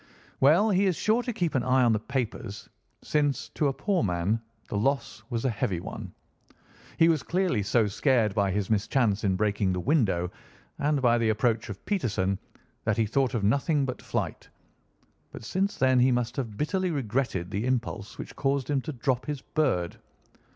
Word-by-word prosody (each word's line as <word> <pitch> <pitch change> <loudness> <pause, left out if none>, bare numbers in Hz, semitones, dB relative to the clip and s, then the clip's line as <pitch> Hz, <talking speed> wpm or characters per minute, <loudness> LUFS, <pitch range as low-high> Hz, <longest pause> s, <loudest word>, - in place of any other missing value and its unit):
"Well, 170 +11 +5
he 195 +1 +3
is 185 - +1
sure 220 +7 +2
to 245 - -3
keep 175 -7 -1
an 130 - +2
eye 130 +1 +3
on 120 -2 +4
the 105 - +1
papers, 115 -4 -4 0.4
since, 145 -2 0
to 150 - 0
a - - +2
poor 180 +8 0
man, 95 +3 0 0.3
the - - -4
loss 120 +1 0
was 120 0 -2
a - - +3
heavy 95 -4 -1
one. - - -7 0.9
He 165 - +6
was 160 -4 +3
clearly 180 - 0
so 105 +3 +2
scared 110 0 +2
by 100 -1 +1
his 100 0 -1
mischance 110 0 +1
in 95 -2 +2
breaking 100 -1 +1
the 90 - -2
window 95 - +1 0.5
and 145 -1 +1
by 120 -1 +4
the 115 -1 +2
approach 110 +1 +1
of 100 - -8
Peterson 105 - 0 0.4
that 110 0 0
he 115 - +3
thought 130 +4 +1
of 110 - -1
nothing 140 - +2
but 125 - -5
flight, - - -3 0.8
but - - -9
since 195 - -1
then 130 -1 +4
he 130 +1 +5
must 120 0 0
have 115 -6 -4
bitterly 185 +4 0
regretted 120 - -1
the 110 +4 -1
impulse 120 -5 -2
which - - -8
caused 140 0 0
him 140 -2 +1
to 155 - -5
drop 125 0 -1
his 145 -3 -3
bird. 125 - 0
125 Hz, 185 wpm, -27 LUFS, 105-145 Hz, 0.9 s, He